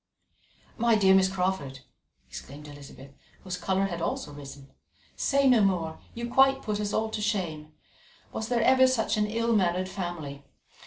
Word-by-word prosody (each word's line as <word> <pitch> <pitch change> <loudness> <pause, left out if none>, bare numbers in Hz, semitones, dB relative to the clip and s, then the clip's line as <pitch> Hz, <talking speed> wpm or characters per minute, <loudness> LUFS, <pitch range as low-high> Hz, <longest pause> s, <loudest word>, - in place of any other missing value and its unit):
"My 235 0 +4
dear 195 -3 +5
Miss 190 0 +5
Crawford," 180 -8 -2 0.5
exclaimed 150 +2 -10
Elizabeth, 140 -2 -12 0.3
whose 185 -2 -4
colour 190 +2 0
had 170 -3 -4
also 150 -3 -3
risen, 140 -1 -11 0.4
"say 275 -1 +2
no 250 -4 +5
more; 175 -5 0 0.2
you 235 0 -4
quite 270 +2 +4
put 210 -1 -2
us 205 -1 -2
all 220 +1 -1
to 215 - -3
shame. 170 -8 -3 0.6
Was 220 - -3
there 235 -1 +1
ever 260 +1 +5
such 245 -4 +1
an 210 0 +1
ill 230 +2 0
mannered 185 -2 +1
family? 170 -7 -6
190 Hz, 160 wpm, -27 LUFS, 160-220 Hz, 0.6 s, dear